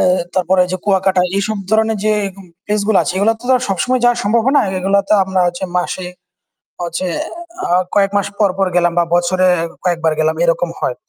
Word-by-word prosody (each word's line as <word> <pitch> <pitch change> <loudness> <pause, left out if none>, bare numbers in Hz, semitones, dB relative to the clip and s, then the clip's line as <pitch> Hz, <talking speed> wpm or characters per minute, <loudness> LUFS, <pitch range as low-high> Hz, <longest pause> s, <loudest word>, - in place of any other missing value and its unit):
এহ 185 0 +3 0.2
তারপরে 185 0 +2
ঐযে 185 +1 -4
কুয়াকাটা 190 -2 +2 0.2
এসব 215 +2 -1
ধরনের 220 0 +2
যে 215 - +2 0.2
এরকম 195 0 -13 0.2
প্লেস 210 0 -1
গুলো 215 - +4
আছে - - -2
সেগুলো 200 +4 +2
তো - - -15
আর - - -3
সবসময় 245 +7 0
যাওয়া 240 0 +4
সম্ভব 230 +2 +2
হবেনা। 280 +2 +4 0.2
এগুলো 195 +2 +1
তো - - +4
আমরা 190 0 -1
হচ্ছে 175 +1 -3
মাসে 180 0 -2 0.8
হচ্ছে 170 +1 -3 0.6
আ - - -7 0.3
কয়েক 195 -1 +3
মাস 200 - 0
পর 205 -2 +4
পর 195 -1 +1
গেলাম 175 -1 +2
বা - - +4
বছরে 185 +1 +2 0.4
কয়েকবার 165 -3 +1
গেলাম 160 0 +1
এরকম 170 0 +1
হয়। 125 - -2
190 Hz, 195 wpm, -16 LUFS, 175-205 Hz, 0.8 s, গুলো